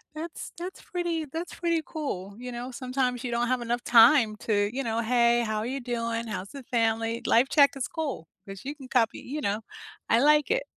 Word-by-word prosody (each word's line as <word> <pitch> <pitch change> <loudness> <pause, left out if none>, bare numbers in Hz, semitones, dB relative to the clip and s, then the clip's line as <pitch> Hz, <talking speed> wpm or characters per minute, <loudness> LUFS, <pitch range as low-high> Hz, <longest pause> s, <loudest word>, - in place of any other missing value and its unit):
that's 320 +1 -6
that's 360 +2 -7
pretty 340 -3 -2
that's 325 +5 -6
pretty 335 -1 0
cool, 200 - -5
you 250 0 -6
know? 245 +2 -6
Sometimes 250 -1 -2
you 245 - -3
don't 235 +1 0
have 255 0 0
enough 240 +1 -2
time 230 -1 +6
to, 205 -2 +1
you 275 +2 -2
know, 230 -1 -1
"Hey, 235 0 +3
how 215 -1 -2
are 215 - -3
you 265 +3 -3
doing? 230 -1 -2
How's 200 -3 -5
the 275 -1 -9
family?" 230 -2 0
"Life 245 +4 +4
check" 285 -2 +6
is 260 -3 -3
cool 280 - -4 0.2
'cause 195 -1 -8
you 285 +2 -5
can 270 -3 -11
copy 235 -3 +1
you 295 +4 -5
know, 205 -2 -1 0.5
I 230 - +5
like 300 +5 +4
it. - - +2
245 Hz, 210 wpm, -27 LUFS, 230-285 Hz, 0.5 s, time